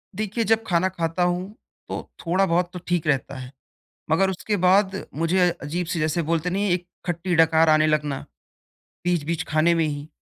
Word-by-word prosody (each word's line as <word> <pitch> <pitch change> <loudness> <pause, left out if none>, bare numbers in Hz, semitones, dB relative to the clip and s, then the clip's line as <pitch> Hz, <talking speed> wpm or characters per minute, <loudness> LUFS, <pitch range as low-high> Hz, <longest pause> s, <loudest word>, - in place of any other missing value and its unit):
देखिए 215 +3 -2
जब 225 0 +2
खाना 180 +1 +2
खाता 170 0 -1
हूँ 180 +3 -1 0.4
तो - - -3 0.2
थोड़ा 185 +3 +2
बहुत 175 0 +1
तो 180 - -6
ठीक 175 -2 0
रहता 140 -1 0
है। 125 0 -8 0.6
मगर 190 +4 +3
उसके 205 +3 -2
बाद 190 +2 +2
मुझे 175 +4 +2
अ, - - -2
अजीब 165 +4 -3
से 175 -1 -2
जैसे 155 +2 0
बोलते 165 +2 -1
नहीं 200 +2 0
एक 175 0 -1 0.2
खट्टी 175 +1 -1
डकार 160 0 +5
आने 155 0 +5
लगना, 150 -3 0 0.9
बीच-बीच 170 -2 0
खाने 155 +3 +3
में 165 -1 +2
ही 145 -1 -4
170 Hz, 180 wpm, -23 LUFS, 155-185 Hz, 0.9 s, डकार